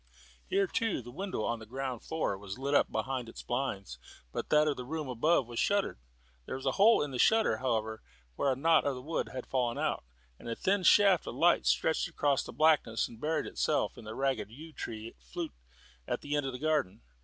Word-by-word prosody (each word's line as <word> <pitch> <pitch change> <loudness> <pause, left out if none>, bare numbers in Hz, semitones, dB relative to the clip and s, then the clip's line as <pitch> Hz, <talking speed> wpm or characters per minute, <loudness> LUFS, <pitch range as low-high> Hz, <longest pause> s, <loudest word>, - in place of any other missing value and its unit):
Here, 395 +1 +2
too, 225 - -1
the 120 - -10
window 185 - -3
on 120 +1 -1
the 110 - -11
ground 130 0 -4
floor 160 -10 -1
was 100 +1 -8
lit 140 +2 -2
up - - +4
behind 130 -3 -2
its - - -10
blinds, 100 - -3 0.3
but - - -4
that 150 0 +5
of 145 - +1
the 125 - -6
room 155 +3 -4
above 130 +4 +2
was 120 0 -5
shuttered. 200 - +1 0.5
There - - -3
was 130 - -7
a 135 - +3
hole 210 - +5
in 145 - -4
the 125 - -4
shutter, 220 - +4
however, 110 -3 -1 0.3
where 140 - +1
a - - +1
knot 160 +4 +4
of 140 -2 0
the 125 - -7
wood 160 +4 -2
had 130 -1 -6
fallen 125 -3 0
out, - - -1 0.4
and - - -8
a 115 - -2
thin 195 - +1
shaft 195 0 +5
of - - -5
light 175 +1 +3
stretched 160 - +2
across 145 -4 +1
the - - -8
blackness 155 -8 +3
and 115 0 -14
buried 155 +2 0
itself - - 0
in 110 - -11
a 110 - -6
ragged 135 -4 -1
yew 155 +8 -11
tree 115 -3 -6 0.9
at - - -2
the 145 +1 -2
end 145 -2 0
of 135 - -4
the - - -4
garden. 150 - 0
135 Hz, 220 wpm, -31 LUFS, 120-160 Hz, 0.9 s, that